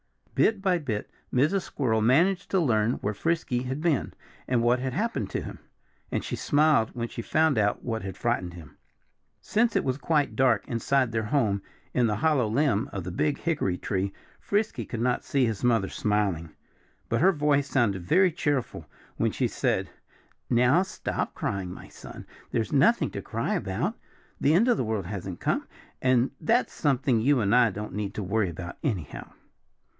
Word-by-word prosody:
Bit 210 -3 +2
by 185 -3 +2
bit 115 -9 -4 0.2
Mrs. 155 +10 +2
Squirrel 115 -10 -1
managed 175 - +3
to 190 - +2
learn 115 -7 +2
where 105 -3 -3
Frisky 160 - -1
had 130 +2 -3
been 160 -6 +1 0.4
and 120 -2 +1
what 120 +2 +3
had 130 0 -3
happened 230 +5 -1
to - - -2
him. - - -8 0.5
And - - -1
she - - -3
smiled 150 -6 +3
when 120 -1 -2
she 115 - -6
found 155 0 +2
out 105 -1 +1
what 115 -2 -2
had 95 -1 -6
frightened 90 -5 -1
him. 75 -4 -13 0.6
Since 230 +2 +1
it - - +2
was 130 +1 -1
quite 145 -7 +1
dark 120 -5 +2
inside 125 +1 +1
their 110 -1 -1
home 105 -5 +1 0.3
in 125 -2 +3
the 105 - 0
hollow 135 0 +2
limb 120 0 +1
of 95 -4 -4
the 90 - -5
big 145 - 0
hickory 140 - -1
tree, 95 +1 -2 0.3
Frisky 200 - -1
could 115 - -5
not 125 0 +1
see 135 -2 +1
his 110 -1 -3
mother 115 -5 +2
smiling. 100 -7 -1 0.5
But 115 - 0
her 190 +3 +6
voice 145 -2 +2
sounded 105 -8 +1
very 185 +1 +4
cheerful 145 -6 -2 0.3
when - - +1
she - - 0
said - - -1 0.6
"Now 125 +7 +4
stop 190 - -3
crying, 95 -3 -3
my - - -10
son. - - -11 0.2
There's - - -2
nothing - - +3
to - - -5
cry - - -2
about. - - -2 0.4
The 150 +3 +3
end 220 +8 +4
of 245 - +3
the - - 0
world 110 -5 -2
hasn't 95 -2 -6
come. - - -1 0.3
And 130 0 +3
that's 235 +10 +2
something 135 -5 +1
you 140 +3 +3
and 100 0 +1
I 125 -1 +5
don't 105 0 -6
need 100 +1 -4
to 105 - -3
worry 100 +1 0
about, 85 +1 -8
anyhow." 95 - -4
120 Hz, 180 wpm, -27 LUFS, 105-150 Hz, 0.6 s, her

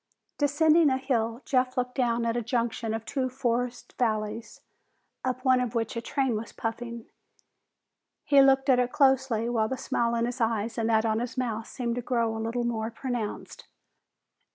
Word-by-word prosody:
Descending 305 +2 +4
a 260 - +1
hill, 235 -2 -1
Jeff 255 -1 +1
looked 250 0 -1
down 235 -3 0
at 230 0 0
a 240 - 0
junction 230 -1 -1
of 225 0 -6
two 260 +1 -1
forested 245 -1 -2
valleys, 220 -1 -2 0.6
up 255 +1 -3
one 255 -1 +5
of 245 -1 -3
which 225 -1 -1
a 230 - -2
train 265 -1 0
was 220 +2 -5
puffing. 235 0 -5 1.2
He 280 -1 +5
looked 270 0 +4
at 255 -2 +5
it 250 0 +1
closely, 265 -5 +2
while 225 -2 +1
the 260 - -3
smile 235 -3 0
in 230 0 +1
his 245 +1 -4
eyes 225 0 0
and 225 0 0
that 220 0 +3
on 220 0 +1
his 245 +2 -5
mouth 230 -3 -2
seemed 240 -3 -3
to - - -1
grow 230 -2 0
a 220 - -4
little 230 +2 -2
more 225 -2 -1
pronounced. 235 -2 -5
240 Hz, 180 wpm, -27 LUFS, 225-255 Hz, 1.2 s, one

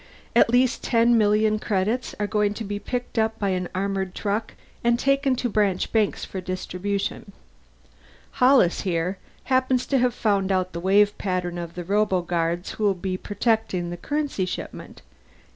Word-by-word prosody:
At 235 - +6
least 245 +1 +2
ten 235 0 +3
million 215 0 +3
credits 215 +4 -1
are 205 - +1
going 210 0 0
to 225 - -5
be 205 0 -4
picked 245 +1 -3
up 220 0 +1
by 200 -2 -1
an 180 -1 -1
armored 190 -1 -2
truck 210 +2 -2 0.3
and 235 0 +3
taken 275 +1 +2
to 245 - -1
branch 205 -4 0
banks 220 -3 +1
for 190 - -6
distribution. 190 +2 -4 1.1
"Hollis, 250 -9 +5
here, 180 0 -1 0.2
happens 260 -1 +1
to 270 - +1
have 245 -1 +1
found 200 -3 +1
out 185 -1 0
the 170 - -4
wave 200 +3 +3
patterns 180 -2 -2
of 170 -1 -7
the 175 - -5
roboguards 175 -3 0
who'll 205 -3 +1
be 185 +1 -3
protecting 205 -3 -1
the - - -4
currency 290 - -2
shipment. - - -7
205 Hz, 160 wpm, -24 LUFS, 185-230 Hz, 1.1 s, At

